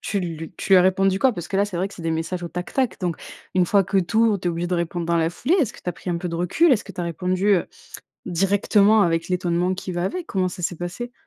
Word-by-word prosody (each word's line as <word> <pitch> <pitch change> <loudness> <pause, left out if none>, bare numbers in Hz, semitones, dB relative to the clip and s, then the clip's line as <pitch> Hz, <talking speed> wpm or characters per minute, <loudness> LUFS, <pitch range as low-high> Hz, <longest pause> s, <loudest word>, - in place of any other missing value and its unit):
tu 200 - -2
lu 165 -1 -5
tu - - -2
lui 190 - +9
as - - +6
répondu 190 +1 +2
quoi? 255 -1 +3
Parce 175 - -6
que 195 - -2
là, 200 - +3
c'est 185 -4 -6
vrai 190 +3 -1
que - - -13
c'est - - -11
des 165 - -1
messages 165 +3 -3
au 170 - -4
tac, 180 +1 -6
tac. 260 -4 0
Donc, 175 -3 -1 0.4
une 180 -1 +3
fois 200 0 +3
que 195 - +1
tu 190 +5 -1
ouvres, 225 -3 +4
tu 175 - -2
es - - +1
obligé 170 +1 -3
de 180 - -1
répondre 170 0 -2
dans 170 0 +1
la 160 0 +2
foulée, 255 - 0
est-ce 255 - -1
que - - -15
tu - - -5
as - - -7
pris 180 - -10
un 175 - 0
peu 175 +1 -4
de 170 - -4
recul? 195 - +3
Est 220 - +2
que 195 - -11
tu 175 - -6
as - - -2
répondu, 180 +4 -1
heu, - - -2 0.6
directement 200 +4 +3
avec 165 -1 0
l'étonnement 180 0 0
qui 185 0 -6
va 175 - -2
avec? 345 - -3
Comment 185 -1 0
ça 180 0 -8
s'est 175 - -1
passé? 180 +9 -6
180 Hz, 310 wpm, -23 LUFS, 170-200 Hz, 0.6 s, lui